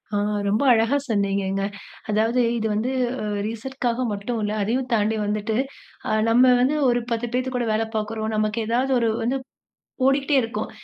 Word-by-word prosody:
ஆ - - +2 0.3
ரொம்ப 215 +7 +1
அழகா 230 +5 +3
சொன்னீங்கங்க. 195 -2 0 0.5
அதாவது 225 +4 +2 0.2
இது 220 -1 -1
வந்து 230 +5 -1 0.3
அ - - -2 0.2
ரீசெட்காக 245 +2 -2
மட்டும் 205 +4 -3
இல்ல. 210 0 -1
அதையும் 250 +5 -1
தாண்டி 220 0 +1
வந்துட்டு, 210 +1 -1 0.7
நம்ம 250 +2 +6
வந்து 270 +4 +2
ஒரு 240 0 +2
10 230 +1 -2
பேர் 255 0 -1
கூட 240 - -1
வேலை 220 +1 0
பார்க்றோம். 220 +1 -3
நமக்கு 215 +1 0
ஏதாவது 255 +3 +1
ஒரு 230 - +2
வந்து 255 +4 0 0.7
ஓடிக்கிட்டே 275 +2 +3
இருக்கோம். 230 0 -4
225 Hz, 155 wpm, -23 LUFS, 215-250 Hz, 0.7 s, நம்ம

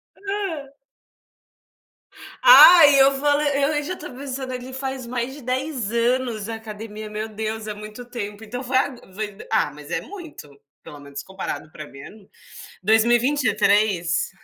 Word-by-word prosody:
Hã. 390 -9 -5 1.7
Ah 360 -8 +10 0.2
eu 270 0 +4
fale 290 +1 +2
e 290 +2 +1
u - - -8
já 365 +4 -4
tô 300 - -9
pensando, 265 -1 -6
ele 255 +1 -7
faz 265 -1 -5
mais 245 +2 -3
de 295 - -11
10 255 -3 -3
anos 235 -2 0
academia. 215 -1 -8
Meu 215 +1 -5
Deus 220 0 -5
é 210 - -3
muito 215 +3 -10
tempo. 215 -3 -7
Então 245 +4 -6
foi 260 +1 0
ago 260 -1 -1
foi 205 -1 -5
ah 220 -9 +1
mas 150 0 -12
é - - -1
muito. 345 - -11 0.3
Pelo 145 - -11
menos 140 0 -8
comparado 190 -3 -7
pra 155 - -9
mim 135 - -14
é - - -9
m 210 -2 -16 0.6
2023? 220 - +2
235 Hz, 155 wpm, -22 LUFS, 210-270 Hz, 1.7 s, Ah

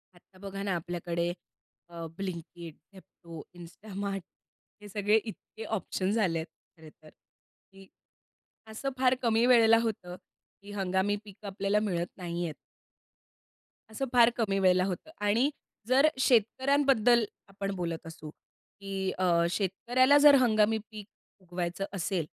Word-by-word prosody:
आता 185 +2 -23
बघा 195 0 -7
ना, 195 -3 -1
आपल्याकडे 170 0 -3 0.6
अ, 170 -1 -7
ब्लिंकिट, 170 -3 -7 0.2
झेप्टो, 170 -3 -12
इन्स्टामार्ट 195 +2 -6 0.6
हे 205 - -11
सगळे 205 +1 +1
इतके 220 0 -10
ऑप्शन्स 195 +3 -2
आले 165 -3 0
आहेत 160 - -5 0.3
खरं 155 - -12
तर, 155 - -14
की 195 +4 -22 0.8
असं 250 +5 -3
फार 255 0 +3
कमी 230 -1 +2
वेळेला 230 -2 +6
होतं 190 -6 -4 0.5
की 205 - -11
हंगामी 195 0 0
पिकं 205 0 -11
आपल्याला 200 +1 0
मिळत 175 -5 -1
नाहीयेत. 170 -2 -4 1.4
असं 270 +5 -3
फार 240 -1 +7
कमी 200 -4 0
वेळेला 185 -1 +4
होतं 195 - -5
आणि 230 +8 +3 0.4
जर 270 +4 +5
शेतकऱ्यांबद्दल 250 0 +3 0.2
आपण 195 0 -5
बोलत 170 -3 -4
असू, 155 -1 -9 0.5
की 195 -1 -3
अ, 170 -2 +3
शेतकऱ्याला 240 +9 +2
जर 290 -1 +10
हंगामी 220 -2 +3
पीक 210 -2 -9 0.3
उगवायचं 180 +1 -4
असेल, 185 -2 -2
195 Hz, 125 wpm, -29 LUFS, 175-220 Hz, 1.4 s, जर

